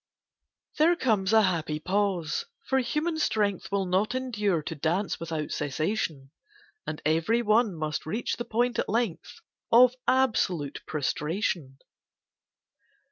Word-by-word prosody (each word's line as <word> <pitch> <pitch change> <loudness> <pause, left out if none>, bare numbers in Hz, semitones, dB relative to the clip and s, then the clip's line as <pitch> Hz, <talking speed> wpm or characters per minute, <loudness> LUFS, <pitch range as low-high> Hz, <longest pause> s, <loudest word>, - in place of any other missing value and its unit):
There 335 +3 +5
comes 215 - +1
a 220 -1 +6
happy 165 -5 0
pause, 185 -3 -1 0.2
for 265 - +2
human 315 +5 -1
strength 205 - 0
Will 200 -1 +1
not 190 +6 +1
endure 210 -10 0
to 165 - -4
dance 165 +7 -1
without 160 -2 -4
cessation; 150 -1 -2 0.6
And 150 - -5
every 165 +10 +2
one 215 -2 +3
must 155 -1 -3
reach 220 +9 -2
the 240 - -4
point 240 +2 0
at - - -1
length 225 -6 -2 0.3
Of 245 +1 +7
absolute 190 - +1
prostration. 150 -1 -2
195 Hz, 125 wpm, -27 LUFS, 160-230 Hz, 0.6 s, Of